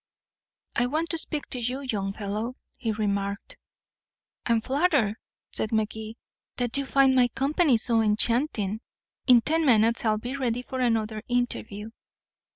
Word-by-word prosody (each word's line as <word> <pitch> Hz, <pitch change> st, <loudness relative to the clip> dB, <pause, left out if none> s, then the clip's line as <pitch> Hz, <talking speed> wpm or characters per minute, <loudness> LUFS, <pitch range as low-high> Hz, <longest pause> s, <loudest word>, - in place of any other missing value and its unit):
"I 245 Hz, -, +2 dB
want 315 Hz, +5 st, -1 dB
to 330 Hz, -, 0 dB
speak 300 Hz, -2 st, -2 dB
to 250 Hz, -, -2 dB
you, 250 Hz, +3 st, -2 dB
young 205 Hz, -7 st, -2 dB
fellow," 215 Hz, +4 st, -4 dB, 0.2 s
he 225 Hz, -, -2 dB
remarked. 200 Hz, -1 st, -2 dB, 0.9 s
"I'm 230 Hz, -1 st, +3 dB
flattered," 265 Hz, -, +1 dB, 0.3 s
said 220 Hz, -, -2 dB
Magee, 220 Hz, 0 st, -2 dB, 0.4 s
"that 245 Hz, -1 st, -1 dB
you 275 Hz, -1 st, +1 dB
find 270 Hz, -1 st, +4 dB
my 250 Hz, -1 st, +5 dB
company 275 Hz, +2 st, +2 dB
so 225 Hz, 0 st, +2 dB
enchanting. 220 Hz, -1 st, +1 dB, 0.5 s
In 245 Hz, -2 st, +7 dB
ten 320 Hz, +6 st, +1 dB
minutes 230 Hz, -4 st, +4 dB
I'll 215 Hz, -2 st, +2 dB
be 245 Hz, +5 st, -5 dB
ready 250 Hz, -3 st, -1 dB
for 260 Hz, +1 st, -5 dB
another 225 Hz, -3 st, 0 dB
interview." 225 Hz, -3 st, -2 dB
235 Hz, 145 wpm, -26 LUFS, 215-265 Hz, 0.9 s, In